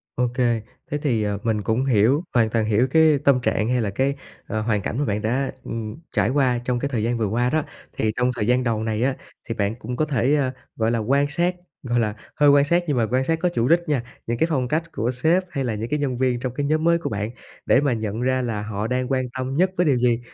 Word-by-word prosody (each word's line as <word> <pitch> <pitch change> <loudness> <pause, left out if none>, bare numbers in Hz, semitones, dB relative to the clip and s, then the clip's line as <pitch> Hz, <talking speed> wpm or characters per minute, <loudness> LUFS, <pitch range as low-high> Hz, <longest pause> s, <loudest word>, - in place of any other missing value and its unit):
Ô 125 0 +1
kê, 120 -3 +1 0.3
thế 150 - 0
thì, 125 -8 0
ờ, 105 -1 -1
mình 110 -2 0
cũng 115 +5 0
hiểu, 130 - +3
hoàn 115 -3 +3
toàn 110 -1 0
hiểu 110 +4 +2
cái 160 -2 +5
tâm 135 -3 +4
trạng 110 -1 0
hay 125 -1 +1
là 105 - -1
cái, 135 +7 0 0.3
à, 110 - -3
hoàn 110 -2 0
cảnh 115 - -3
mà 145 - +1
bạn 105 -1 -1
đã, 130 +5 0
ừm, 110 -1 -5 0.2
trải - - +3
qua 130 -3 +2
trong 125 -1 0
cái 140 - -2
thời 115 -5 -1
gian 120 +1 0
vừa 110 - 0
qua 120 +4 +1
đó. 155 +1 +1 0.3
Thì 110 -1 +1
trong 125 +1 +1
thời 105 -2 -2
gian 125 +1 +3
đầu 110 -2 0
này 110 +1 -1
á, 135 0 +1 0.3
thì 115 - -2
bạn 100 +2 -1
cũng 125 +1 -6
có 155 - +1
thể, 140 0 +2 0.4
gọi 110 0 +1
là, 115 - +1
quan 140 +6 +2
sát, 175 +3 +1 0.3
gọi 120 -1 0
là, 105 -2 0 0.2
hơi 145 -1 +5
quan 140 0 +6
sát 175 +3 +2
nhưng 140 -4 0
mà 115 - +3
quan 130 +1 +2
sát 160 +3 0
có 180 +1 +1
chủ 125 -8 0
đích 170 +3 +4
nha, 130 -5 +1 0.2
những 115 0 -1
cái 160 - +2
phong 130 -5 0
cách 165 +4 -2
của 120 +3 -1
sếp 160 +9 +2
hay 135 - -2
là 115 -4 -1
những 110 +3 -4
cái 150 0 0
nhân 130 -4 -1
viên 125 -2 +1
trong 125 -1 -3
cái 145 +1 -2
nhóm 155 +2 +1
mới 170 0 +4
của 170 - -4
bạn 105 0 -3 0.4
để 135 - +4
mà 140 -4 +1
nhận 110 0 -3
ra 130 0 +1
là 110 -4 -2
họ 105 0 -3
đang 125 0 -1
quan 130 -1 +1
tâm 130 +1 -3
nhất 185 +3 +3
với 180 - +3
điều 135 -4 +3
gì. 120 -1 +2
125 Hz, 275 wpm, -23 LUFS, 115-140 Hz, 0.4 s, quan